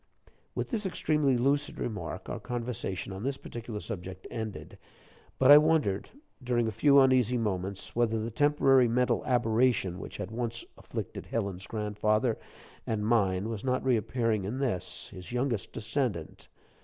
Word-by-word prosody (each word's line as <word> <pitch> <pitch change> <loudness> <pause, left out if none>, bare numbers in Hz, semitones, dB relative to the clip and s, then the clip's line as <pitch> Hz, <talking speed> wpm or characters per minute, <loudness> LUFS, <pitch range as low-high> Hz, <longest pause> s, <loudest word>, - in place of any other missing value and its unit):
With - - -3
this 215 -5 -1
extremely 150 -7 +1
lucid 140 +4 +1
remark, 105 -8 -4
our - - -4
conversation 120 -6 -3
on 95 - -6
this 135 +3 -2
particular 115 -2 -6
subject 95 -4 -6
ended; 110 -3 -6 0.6
but 135 +1 +6
I 145 - +12
wondered, 150 -11 +1 0.3
during 120 -2 +1
a - - -1
few 140 +6 +5
uneasy 130 -2 +4
moments, 100 -3 -3
whether 115 -1 +2
the 110 +2 -3
temporary 135 -1 +4
mental 125 +2 +1
aberration 115 -6 +2
which - - -8
had 90 - -5
once 115 0 -3
afflicted - - -6
Helen's 100 -4 -3
grandfather 110 +2 0 0.5
and 105 -2 -1
mine 100 -4 +2
was 110 -2 -4
not 130 0 0
reappearing 115 -3 +1
in 105 +7 -3
this, 125 -10 -2
his 90 +1 -10
youngest 125 -4 -1
descendant. 110 - -3
115 Hz, 145 wpm, -29 LUFS, 105-130 Hz, 0.6 s, I